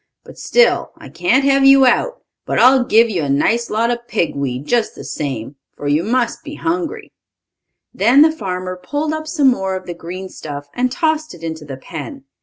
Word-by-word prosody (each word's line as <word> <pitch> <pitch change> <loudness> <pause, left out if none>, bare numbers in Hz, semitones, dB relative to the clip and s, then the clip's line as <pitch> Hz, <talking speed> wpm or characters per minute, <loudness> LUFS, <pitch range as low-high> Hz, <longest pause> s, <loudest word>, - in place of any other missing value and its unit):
But - - -14
still 485 0 +2
I - - -12
can't 275 -6 +1
have 275 0 +3
you 270 0 +7
out. - - +1 0.2
But - - -1
I'll 260 0 +6
give 230 0 +4
you 190 -7 -2
a 145 - -2
nice 225 +12 +1
lot 230 +2 +1
of 240 0 -5
pig 190 -7 -1
weed, 135 -1 -3
just 235 +5 0
the - - -9
same, 135 -3 -5 0.2
for 145 - -5
you 150 +3 +2
must 235 - -1
be 295 -1 -8
hungry." 335 0 -3 0.8
Then 250 +5 +5
the 315 - +4
farmer 185 -8 -5
pulled 295 +10 -2
up 315 0 -5
some 295 -4 +3
more 190 -6 -1
of 185 - -6
the 175 - -5
green 180 +3 -7
stuff, 145 -5 -8
and 250 0 0
tossed 315 - -1
it 165 - -15
into 160 -2 -5
the 135 -2 -7
pen. 275 - -8
235 Hz, 205 wpm, -18 LUFS, 170-275 Hz, 0.8 s, you